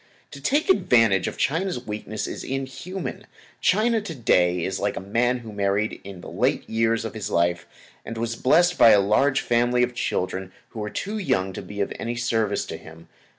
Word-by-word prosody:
To 140 - -10
take 290 - +1
advantage 115 - +4
of - - -5
China's 165 -4 -1
weakness 105 0 -4
is - - -6
inhuman. 135 +8 -5 0.3
China, 220 +3 +2
to 170 -6 -7
day, 90 -8 +2
is 95 - -2
like 100 0 -1
a - - -1
man 120 +6 +1
who 110 - -8
married 100 +1 -1
in 95 -2 -9
the - - -10
late - - 0
years 115 0 +1
of 110 - -5
his 110 -3 -4
life, 85 +1 +1 0.4
and 115 - -7
was 115 0 -2
blessed 175 +9 +3
with 115 -2 +8
a - - +5
large 135 +8 +2
family 120 +1 +2
of 125 0 -1
children 95 -4 -2 0.2
who 110 - -9
were 105 0 -3
too 210 - -4
young 95 - 0
to - - -6
be 105 0 -6
of 100 - -1
any 120 +1 -3
service 115 -3 0
to - - -6
him. 80 +1 -14
115 Hz, 195 wpm, -24 LUFS, 100-135 Hz, 0.4 s, with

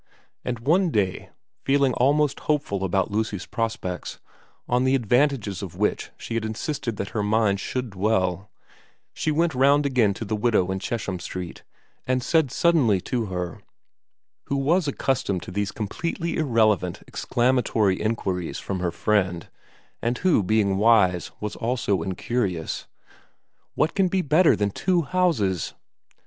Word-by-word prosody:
And 125 -1 -2
one 170 +8 +3
day, 100 - -1 0.3
feeling 135 -1 +3
almost 145 +2 +2
hopeful 140 -10 0
about 95 +1 0
Lucy's 105 -2 -2
prospects, 110 -6 -4 0.5
on 125 +1 +2
the 130 +1 +3
advantages 120 -5 +1
of 95 -4 -7
which - - -1
she - - -7
had 115 -1 -1
insisted 115 +1 -3
that 100 - -3
her 110 - -2
mind 105 -1 +2
should 125 +2 -3
dwell, 95 -1 0 0.6
she - - -2
went 160 +2 +2
round 140 +3 +4
again 120 -8 +2
to 115 - -5
the 110 - -1
widow 105 -4 +2
in 95 - -2
Chesham 100 -3 -3
Street 90 -1 -6 0.5
and 130 -1 +1
said 160 -2 +2
suddenly 140 - +3
to 120 +2 -2
her, 90 -2 -4 0.8
who 140 - -2
was 155 +5 +2
accustomed 125 -9 -1
to - - -8
these 100 +2 -1
completely 165 - -3
irrelevant 110 - +1
exclamatory 120 -6 +1
inquiries 95 -6 -2
from 95 -2 -4
her 90 -1 0
friend, 90 -1 0 0.5
and 120 +2 0
who 180 - +3
being 100 0 +2
wise 100 -5 +4
was 105 -1 -4
also 115 -6 0
incurious, 95 -1 -2 0.4
' - - -46
What 160 - +1
can 195 -1 +2
be 185 0 0
better 155 +4 +4
than 105 -1 0
two 180 - +1
houses 140 - 0
110 Hz, 145 wpm, -24 LUFS, 95-135 Hz, 0.8 s, round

